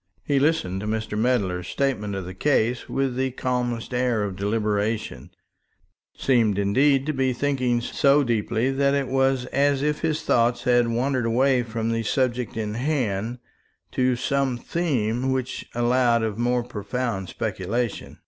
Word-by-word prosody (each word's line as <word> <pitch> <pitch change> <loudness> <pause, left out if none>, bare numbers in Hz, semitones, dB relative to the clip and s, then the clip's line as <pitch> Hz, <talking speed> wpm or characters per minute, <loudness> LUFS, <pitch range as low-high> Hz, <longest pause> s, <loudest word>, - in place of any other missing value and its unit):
He 140 -2 +1
listened 135 - +1
to 105 - -4
Mr. 110 -1 -2
Medler's 105 -6 0
statement 105 -8 -1
of 95 -2 -4
the 90 - -7
case 120 +1 0
with 135 -2 -1
the 130 +1 0
calmest 125 -2 -2
air 125 -3 +1
of 100 -2 -3
deliberation, 105 - -1 0.9
seemed 115 -6 +2
indeed 135 +7 +3
to 155 - -1
be 130 -2 +1
thinking 130 -3 0
so 140 +4 +3
deeply 115 +1 0
that 140 +1 +2
it 140 -2 0
was 135 -1 +1
as 140 0 +2
if 150 0 0
his 160 -1 -1
thoughts 120 0 +2
had 120 -2 +3
wandered 125 +1 0
away 130 +2 +3
from 115 -1 -3
the 115 0 0
subject 125 0 -1
in 105 -1 -2
hand 120 -4 -1 0.5
to 130 -1 +1
some 135 0 0
theme 130 -5 -1
which 130 -1 -3
allowed 120 -1 +2
of 110 -2 -1
more 120 0 +1
profound 115 -3 -3
speculation. 115 +5 -3
120 Hz, 150 wpm, -24 LUFS, 110-135 Hz, 0.9 s, indeed